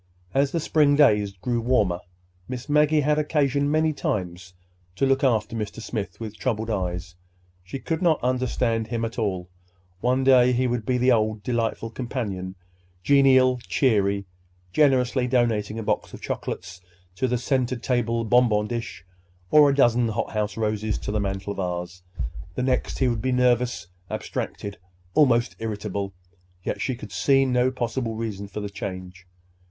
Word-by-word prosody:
As 140 Hz, 0 st, +2 dB
the 170 Hz, -, 0 dB
spring 150 Hz, -2 st, +3 dB
days 105 Hz, -9 st, +4 dB
grew 115 Hz, +5 st, -2 dB
warmer, 105 Hz, -8 st, +2 dB, 0.5 s
Miss 125 Hz, 0 st, -6 dB
Maggie 150 Hz, +1 st, +4 dB
had 150 Hz, +1 st, +2 dB
occasion 145 Hz, -2 st, +1 dB
many 155 Hz, +1 st, +2 dB
times 90 Hz, -7 st, -3 dB, 0.4 s
to 135 Hz, -, +1 dB
look 135 Hz, +1 st, +2 dB
after 110 Hz, -4 st, +1 dB
Mr. 110 Hz, 0 st, -4 dB
Smith 105 Hz, -5 st, -5 dB
with 110 Hz, -2 st, -7 dB
troubled 115 Hz, -3 st, -1 dB
eyes. 90 Hz, -2 st, -3 dB, 0.5 s
She 95 Hz, +8 st, -6 dB
could 160 Hz, +5 st, -3 dB
not 165 Hz, -4 st, +3 dB
understand 125 Hz, -3 st, 0 dB
him 115 Hz, -1 st, -2 dB
at 115 Hz, +2 st, -5 dB
all. 95 Hz, -5 st, -1 dB, 0.5 s
One 125 Hz, +5 st, +1 dB
day 125 Hz, -1 st, +6 dB
he 125 Hz, +1 st, +1 dB
would 120 Hz, -3 st, -2 dB
be 125 Hz, -, +2 dB
the 125 Hz, +1 st, +3 dB
old 110 Hz, -2 st, +1 dB
delightful 115 Hz, -2 st, -1 dB
companion, 105 Hz, -7 st, -4 dB, 0.5 s
genial, 130 Hz, -1 st, +5 dB
cheery, 100 Hz, -6 st, +2 dB, 0.5 s
generously 130 Hz, -3 st, +3 dB
donating 115 Hz, -4 st, +1 dB
a 115 Hz, -, -3 dB
box -, -, -2 dB
of -, -, -11 dB
chocolates 90 Hz, +1 st, -5 dB, 0.4 s
to 130 Hz, -, +1 dB
the 125 Hz, 0 st, 0 dB
center 130 Hz, 0 st, 0 dB
table 115 Hz, -1 st, 0 dB
bonbon 115 Hz, -3 st, +3 dB
dish 115 Hz, -5 st, -5 dB, 0.5 s
or 150 Hz, -1 st, +7 dB
a 140 Hz, -, +1 dB
dozen 120 Hz, -3 st, +4 dB
hothouse 105 Hz, -1 st, -2 dB
roses 110 Hz, -1 st, -1 dB
to -, -, -5 dB
the 105 Hz, -, 0 dB
mantel 100 Hz, 0 st, -3 dB
vase. 90 Hz, -2 st, -4 dB, 0.5 s
The 125 Hz, -, -1 dB
next, 130 Hz, -1 st, 0 dB
he 130 Hz, -, +2 dB
would 115 Hz, -3 st, -1 dB
be 130 Hz, -, 0 dB
nervous, 125 Hz, -6 st, +2 dB, 0.2 s
abstracted, 100 Hz, 0 st, -5 dB, 0.3 s
almost 120 Hz, -4 st, +3 dB
irritable. 100 Hz, -3 st, -3 dB, 0.5 s
Yet -, -, -3 dB
she 130 Hz, -, -1 dB
could 105 Hz, -4 st, -10 dB
see 135 Hz, +3 st, +3 dB
no 125 Hz, -1 st, +2 dB
possible 120 Hz, -2 st, -3 dB
reason 105 Hz, -3 st, -4 dB
for 105 Hz, -, -6 dB
the 105 Hz, -, -4 dB
change. 95 Hz, -2 st, -7 dB
115 Hz, 160 wpm, -24 LUFS, 105-130 Hz, 0.5 s, or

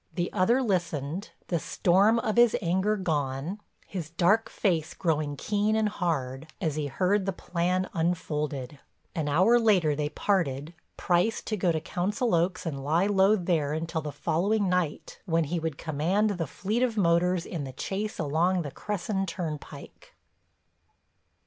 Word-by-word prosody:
The 175 Hz, -1 st, -2 dB
other 235 Hz, +8 st, +3 dB
listened, 170 Hz, -, -2 dB, 0.2 s
the 170 Hz, -, +1 dB
storm 195 Hz, +8 st, +3 dB
of 225 Hz, -2 st, -1 dB
his 240 Hz, -1 st, +5 dB
anger 190 Hz, +4 st, +1 dB
gone, 150 Hz, 0 st, -2 dB, 0.3 s
his 175 Hz, -6 st, -5 dB
dark 190 Hz, +7 st, +2 dB
face 170 Hz, -6 st, 0 dB
growing 155 Hz, -4 st, 0 dB
keen 210 Hz, +4 st, 0 dB
and 220 Hz, -1 st, +2 dB
hard 155 Hz, -8 st, -2 dB
as 160 Hz, -5 st, -1 dB
he 150 Hz, -2 st, -2 dB
heard 190 Hz, +7 st, +1 dB
the -, -, +2 dB
plan 180 Hz, +1 st, -1 dB
unfolded. 150 Hz, -5 st, -2 dB, 0.3 s
An 155 Hz, -3 st, -2 dB
hour 190 Hz, +11 st, +5 dB
later 185 Hz, -10 st, +3 dB
they 150 Hz, 0 st, -1 dB
parted, 160 Hz, -5 st, -1 dB, 0.2 s
Price 180 Hz, +5 st, +2 dB
to 215 Hz, -, -2 dB
go 180 Hz, -3 st, +1 dB
to 160 Hz, -, 0 dB
Council 205 Hz, -, -1 dB
Oaks 175 Hz, +2 st, +1 dB
and 140 Hz, -5 st, -4 dB
lie 160 Hz, +6 st, +2 dB
low 200 Hz, +1 st, +4 dB
there 170 Hz, -6 st, 0 dB
until 160 Hz, +1 st, -2 dB
the 150 Hz, -1 st, -5 dB
following 195 Hz, +8 st, 0 dB
night 180 Hz, -4 st, -1 dB
when 165 Hz, -3 st, +2 dB
he 165 Hz, +3 st, -2 dB
would 160 Hz, -3 st, -3 dB
command 170 Hz, +8 st, 0 dB
the 175 Hz, -5 st, -2 dB
fleet 210 Hz, -, -2 dB
of 240 Hz, -3 st, +1 dB
motors 175 Hz, -1 st, +2 dB
in 165 Hz, -5 st, -4 dB
the 135 Hz, -, -6 dB
chase 200 Hz, +9 st, -3 dB
along 170 Hz, +4 st, +1 dB
the 145 Hz, -, -6 dB
Cresson 195 Hz, +1 st, -3 dB
Turnpike. 155 Hz, -5 st, -7 dB
175 Hz, 155 wpm, -28 LUFS, 155-200 Hz, 0.3 s, his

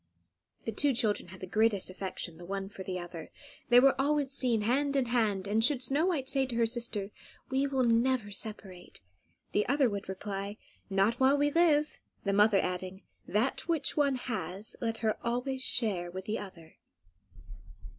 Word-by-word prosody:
The -, -, -1 dB
two 285 Hz, -3 st, +1 dB
children 215 Hz, -6 st, 0 dB
had 190 Hz, +1 st, -12 dB
the -, -, -4 dB
greatest 215 Hz, 0 st, +1 dB
affection 185 Hz, -3 st, -5 dB
the 175 Hz, -, -11 dB
one 195 Hz, 0 st, -4 dB
for 205 Hz, -2 st, -10 dB
the 185 Hz, -1 st, -4 dB
other. 175 Hz, -2 st, -8 dB, 0.4 s
They 245 Hz, 0 st, +8 dB
were 275 Hz, +1 st, +6 dB
always 285 Hz, -1 st, +1 dB
seen 245 Hz, -5 st, +1 dB
hand 275 Hz, +6 st, +1 dB
in 270 Hz, -2 st, +2 dB
hand; 215 Hz, -5 st, 0 dB
and 215 Hz, +2 st, +2 dB
should 260 Hz, 0 st, +3 dB
Snow 290 Hz, +7 st, +2 dB
White 295 Hz, -8 st, -1 dB
say 270 Hz, -1 st, +2 dB
to 245 Hz, -, -5 dB
her 235 Hz, 0 st, +3 dB
sister, 225 Hz, -4 st, -2 dB, 0.4 s
"We 270 Hz, +1 st, +1 dB
will 265 Hz, -2 st, +1 dB
never 235 Hz, -2 st, +2 dB
separate," 195 Hz, -3 st, -5 dB, 0.5 s
the 210 Hz, -, +1 dB
other 275 Hz, -4 st, +3 dB
would 200 Hz, -1 st, -5 dB
reply, 200 Hz, +1 st, -5 dB, 0.3 s
"Not 195 Hz, +4 st, +2 dB
while 270 Hz, +2 st, +4 dB
we 290 Hz, +1 st, +2 dB
live," 305 Hz, -2 st, +2 dB, 0.2 s
the 200 Hz, -, 0 dB
mother 205 Hz, 0 st, +5 dB
adding, 185 Hz, +1 st, -3 dB, 0.2 s
"That 225 Hz, +10 st, -1 dB
which 315 Hz, -5 st, 0 dB
one 280 Hz, -3 st, +2 dB
has, 210 Hz, -5 st, -5 dB
let 225 Hz, -1 st, -1 dB
her 215 Hz, -, +1 dB
always 250 Hz, +3 st, -2 dB
share 205 Hz, -9 st, +2 dB
with 185 Hz, +2 st, -7 dB
the 215 Hz, +1 st, -2 dB
other." 170 Hz, -5 st, -11 dB
225 Hz, 175 wpm, -30 LUFS, 195-265 Hz, 0.5 s, They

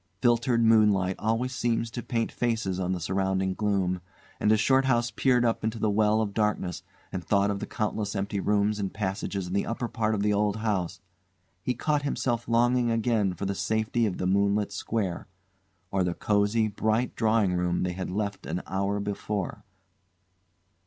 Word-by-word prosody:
Filtered 120 Hz, +1 st, +3 dB
moonlight 105 Hz, -4 st, +4 dB
always 115 Hz, +4 st, 0 dB
seems 115 Hz, -2 st, 0 dB
to 120 Hz, -, -4 dB
paint 115 Hz, -1 st, -2 dB
faces 110 Hz, -6 st, -1 dB
on 90 Hz, 0 st, -1 dB
the 90 Hz, -, -1 dB
surrounding 95 Hz, +1 st, 0 dB
gloom, 95 Hz, -3 st, 0 dB, 0.4 s
and 105 Hz, -, +3 dB
as 110 Hz, -, +4 dB
Shorthouse 125 Hz, 0 st, +3 dB
peered 125 Hz, -2 st, +2 dB
up 115 Hz, -1 st, 0 dB
into 110 Hz, +1 st, -1 dB
the 110 Hz, -1 st, +1 dB
well 105 Hz, +1 st, +3 dB
of 105 Hz, -2 st, -2 dB
darkness 105 Hz, -5 st, -1 dB, 0.3 s
and 90 Hz, -, -4 dB
thought 100 Hz, +3 st, +2 dB
of 100 Hz, -, -3 dB
the -, -, -5 dB
countless 105 Hz, -2 st, -2 dB
empty 100 Hz, +1 st, -2 dB
rooms 105 Hz, +1 st, +1 dB
and 100 Hz, -2 st, -2 dB
passages 100 Hz, -1 st, -3 dB
in 90 Hz, -, -6 dB
the 100 Hz, -, 0 dB
upper 120 Hz, +1 st, -2 dB
part 110 Hz, -1 st, 0 dB
of 100 Hz, -, -1 dB
the 105 Hz, 0 st, +2 dB
old 105 Hz, 0 st, +1 dB
house, 100 Hz, -4 st, -2 dB, 0.6 s
he 125 Hz, +6 st, -1 dB
caught 150 Hz, +4 st, 0 dB
himself 120 Hz, -4 st, -1 dB
longing 120 Hz, +1 st, +3 dB
again 115 Hz, -4 st, +1 dB
for 100 Hz, -, -4 dB
the 100 Hz, -, -1 dB
safety 110 Hz, +3 st, 0 dB
of 95 Hz, -, -3 dB
the -, -, -2 dB
moonlit 100 Hz, +2 st, +2 dB
square, 100 Hz, -2 st, -3 dB, 0.6 s
or 95 Hz, -1 st, +1 dB
the 90 Hz, -1 st, -1 dB
cosy, 105 Hz, +2 st, +2 dB
bright 110 Hz, +3 st, 0 dB
drawing 110 Hz, -4 st, +2 dB
room 90 Hz, 0 st, 0 dB
they 90 Hz, 0 st, -1 dB
had 90 Hz, +1 st, -4 dB
left 100 Hz, +1 st, -3 dB
an 90 Hz, +3 st, -3 dB
hour 100 Hz, +2 st, -1 dB
before. 100 Hz, -1 st, -3 dB
105 Hz, 180 wpm, -27 LUFS, 95-115 Hz, 0.6 s, moonlight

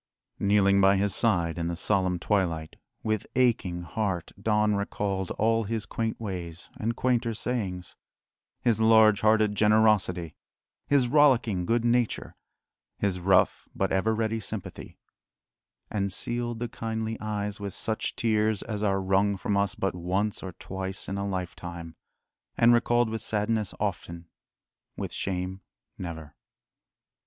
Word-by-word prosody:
Kneeling 100 Hz, -1 st, +4 dB
by 95 Hz, 0 st, +5 dB
his 100 Hz, 0 st, +1 dB
side 85 Hz, -7 st, +1 dB
in 85 Hz, -, -1 dB
the 85 Hz, -, -2 dB
solemn 95 Hz, 0 st, +1 dB
twilight, 85 Hz, -5 st, -1 dB, 0.3 s
with 110 Hz, -2 st, -1 dB
aching 105 Hz, -9 st, +1 dB
heart 90 Hz, -1 st, -2 dB
Don 105 Hz, 0 st, +2 dB
recalled 100 Hz, -2 st, -2 dB
all 115 Hz, +1 st, +2 dB
his 110 Hz, +1 st, -3 dB
quaint 115 Hz, -1 st, -3 dB
ways 90 Hz, -6 st, -6 dB
and 115 Hz, +2 st, -1 dB
quainter 120 Hz, -2 st, 0 dB
sayings, 95 Hz, -7 st, -3 dB, 0.7 s
his 115 Hz, -3 st, +2 dB
large 110 Hz, -2 st, +6 dB
hearted 110 Hz, -1 st, +3 dB
generosity, 105 Hz, -5 st, +3 dB, 0.5 s
his 140 Hz, -3 st, +3 dB
rollicking 120 Hz, -10 st, +3 dB
good 120 Hz, 0 st, +1 dB
nature, 120 Hz, -1 st, 0 dB, 0.6 s
his 95 Hz, -3 st, -1 dB
rough 95 Hz, +1 st, +2 dB
but 95 Hz, -, 0 dB
ever 110 Hz, +4 st, +1 dB
ready 110 Hz, 0 st, -1 dB
sympathy 105 Hz, -, -7 dB, 0.9 s
and 100 Hz, -1 st, -1 dB
sealed 120 Hz, +3 st, -2 dB
the 120 Hz, -, -2 dB
kindly 110 Hz, -1 st, -3 dB
eyes 105 Hz, -1 st, -3 dB
with 100 Hz, -1 st, -5 dB
such 110 Hz, -1 st, -2 dB
tears 110 Hz, -2 st, +1 dB
as 105 Hz, -2 st, -4 dB
are 100 Hz, -2 st, +1 dB
wrung 95 Hz, +1 st, +2 dB
from 100 Hz, +2 st, -1 dB
us 100 Hz, -1 st, +1 dB
but 95 Hz, -, -1 dB
once 95 Hz, +4 st, -1 dB
or 95 Hz, -2 st, -6 dB
twice 95 Hz, +2 st, -6 dB
in 100 Hz, +1 st, -3 dB
a 100 Hz, -, -2 dB
lifetime, 85 Hz, -3 st, -5 dB, 0.6 s
and 115 Hz, +1 st, +6 dB
recalled 120 Hz, 0 st, +3 dB
with 110 Hz, -1 st, -3 dB
sadness 105 Hz, -1 st, 0 dB
often, 85 Hz, -4 st, -4 dB, 0.7 s
with -, -, -4 dB
shame 95 Hz, 0 st, -3 dB, 0.4 s
never. 80 Hz, -4 st, -7 dB
100 Hz, 135 wpm, -27 LUFS, 95-110 Hz, 0.9 s, large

